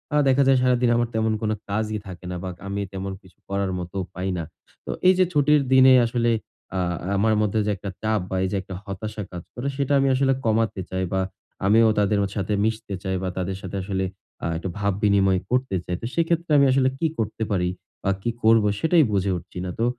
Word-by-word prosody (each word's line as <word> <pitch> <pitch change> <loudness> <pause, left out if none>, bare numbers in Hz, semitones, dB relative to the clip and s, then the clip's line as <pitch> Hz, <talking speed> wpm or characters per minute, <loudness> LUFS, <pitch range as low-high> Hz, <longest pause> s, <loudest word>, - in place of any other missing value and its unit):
আ - - +4
দেখা 135 +1 +4
যায় 135 -1 +5
সারাদিন 125 -1 +3
আমার 120 0 +1
তেমন 110 0 +1
কোনো 110 -1 0 0.2
কাজই 110 +1 -1
থাকে 90 -1 -9
না - - -3
বা 95 - -3 0.2
আমি 100 +1 -2
তেমন 95 0 -4
কিছু 95 - -21
করার 100 -1 -1
মতোও 90 +2 -4
পাই 95 +1 -3
না। 85 - -2 0.4
তো - - -3 0.2
এই 185 - +8
যে 185 - +6
ছুটির 150 0 +4
দিনে 130 0 +8
আসলে 115 0 +1 0.5
আ - - +1 0.4
আমার 110 +2 +3
মধ্যে 105 +1 +1
যে 105 - +1
একটা 100 +1 -6
চাপ 110 0 +1
বা - - -2
এই - - +1
যে - - -1
একটা 95 0 -8
হতাশা 105 +2 -5
কাজ 90 -1 -7
করে 125 +3 -4
সেটা 140 0 0
আমি 135 - +3
আসলে 135 0 +3
কমাতে 110 -3 +1
চাই 95 0 -2
বা 95 - +2 0.4
আমিও 110 +2 +5
তাদের 105 0 +2 0.2
সাথে 100 0 -1
মিশতে 110 -2 -2
চাই 95 -1 -1
বা 95 - -1
তাদের 95 +1 -2
সাথে 95 +1 -6
আসলে 95 0 -1 0.4
আ - - -1
একটু 90 +3 -4
ভাব 100 -1 +1
বিনিময় 95 -2 +4
করতে 125 -4 0
চাই। 90 - -2
তো - - -4
সেক্ষেত্রে 170 0 0
আমি 140 - +6
আসলে 130 0 +3
কি 165 - +2
করতে 110 0 -2
পারি? 90 -3 +1 0.3
বা 100 - +1
কি 120 - -1
করবো? 110 -1 +5
সেটাই 160 0 +4
বুঝে 100 -1 +1
উঠছি 85 - -11
না। - - -3
তো 115 - +2
105 Hz, 220 wpm, -24 LUFS, 95-125 Hz, 0.5 s, এই